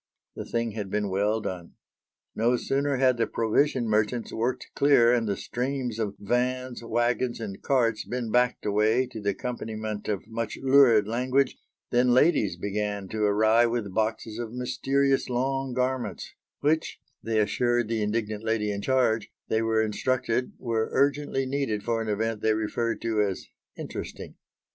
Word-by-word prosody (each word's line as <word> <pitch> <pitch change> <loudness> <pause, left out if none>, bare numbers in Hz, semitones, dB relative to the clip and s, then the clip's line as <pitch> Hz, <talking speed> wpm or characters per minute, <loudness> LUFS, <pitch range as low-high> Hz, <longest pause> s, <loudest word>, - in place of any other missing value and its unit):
The - - -6
thing 115 -1 -1
had 105 -2 -5
been 105 0 -1
well 105 +3 +1
done. 90 -4 -6 0.6
No 120 +3 +2
sooner 140 +2 0
had 130 -1 +3
the 115 - +1
provision 120 +2 +1
merchants 110 +2 0
worked 120 +3 -2
clear 125 -4 +5
and 115 -2 +1
the 100 -2 -1
streams 125 -2 -3
of 105 -3 -2
vans, 125 +3 -1
waggons 120 +1 0
and 100 -4 -6
carts 115 -5 +1
been 120 -3 -4
backed 125 +1 +2
away 110 +4 +2
to 120 -3 -8
the 100 - 0
accompaniment 110 -1 -4
of 100 -3 -2
much 115 -1 -4
lurid 130 -6 +5
language, 130 +4 +1 0.4
than 125 0 +4
ladies 130 - +3
began 100 0 -3
to 110 - -3
arrive 110 +3 +4
with 115 -5 -3
boxes 110 +1 -2
of 115 -2 -4
mysterious 135 +3 0
long 135 +2 -1
garments 130 0 -2 0.3
which, 155 +2 +1 0.2
they 110 -1 -1
assured 120 +3 +1
the 115 -1 -1
indignant 105 0 -2
lady 110 -2 0
in 100 0 -3
charge, 120 -3 +1 0.2
they 110 - +2
were 110 0 +2
instructed 125 +3 -1
were 115 -2 -1
urgently 140 0 +1
needed 130 -6 -2
for 115 -1 0
an 110 - -4
event 110 +1 -1
they 110 -1 +2
referred 115 +2 -1
to 110 -2 +1
as 100 -3 -2 0.3
"interesting." - - -7
115 Hz, 160 wpm, -27 LUFS, 110-125 Hz, 0.6 s, clear